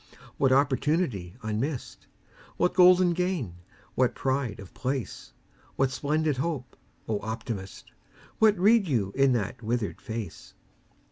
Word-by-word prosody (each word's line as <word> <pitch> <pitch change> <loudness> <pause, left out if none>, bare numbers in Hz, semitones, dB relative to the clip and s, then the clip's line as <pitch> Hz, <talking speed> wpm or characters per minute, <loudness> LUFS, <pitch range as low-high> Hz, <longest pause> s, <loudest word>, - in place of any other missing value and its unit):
What 135 -1 +3
opportunity 135 - +1
unmissed? 115 +6 -4 0.5
What 180 - +2
golden 180 -1 +6
gain, 170 - -2 0.4
what 125 -1 +1
pride 130 -5 -1
of 100 -2 -11
place? 130 -2 -4 0.4
What 135 -1 +1
splendid 150 +2 0
hope? 135 -3 -3 0.3
O 110 -2 -1
Optimist! 110 -3 -6 0.5
What 215 -2 +5
read 205 +2 +4
you 110 - 0
in 135 -1 +4
that 115 +1 -2
withered 115 -1 -2
face? 110 -7 -7
130 Hz, 120 wpm, -27 LUFS, 110-160 Hz, 0.5 s, golden